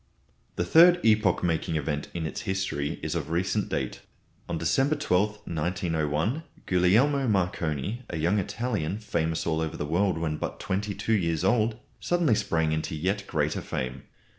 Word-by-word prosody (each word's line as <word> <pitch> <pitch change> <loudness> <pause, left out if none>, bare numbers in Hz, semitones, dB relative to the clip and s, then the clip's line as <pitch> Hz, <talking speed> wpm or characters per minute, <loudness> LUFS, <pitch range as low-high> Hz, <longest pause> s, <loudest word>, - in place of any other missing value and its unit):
The - - -1
third 175 +2 +7
epoch 110 -5 +3
making 85 -1 0
event 75 -1 -2
in 85 -2 -2
its 80 - -4
history 95 -7 -2
is - - -2
of - - -3
recent 85 +3 0
date. - - -3 0.5
On 85 - -1
December 135 - +2
12, 105 -6 0
1901, 85 - -1 0.2
Guglielmo 115 +10 +3
Marconi, 90 - -1
a 85 - -3
young 85 +7 +2
Italian, 100 -4 -2
famous 85 -7 -1
all 80 -1 0
over 80 0 -3
the - - -2
world 90 +4 +1
when 80 -2 -2
but - - -4
twenty 100 0 -2
two 110 - -1
years 85 -6 +1
old, 110 -1 +2 0.2
suddenly 175 -8 +2
sprang 80 -6 +1
into 80 +1 -2
yet 95 +6 -1
greater 75 -2 0
fame. 65 +1 -4
90 Hz, 160 wpm, -27 LUFS, 80-105 Hz, 0.5 s, third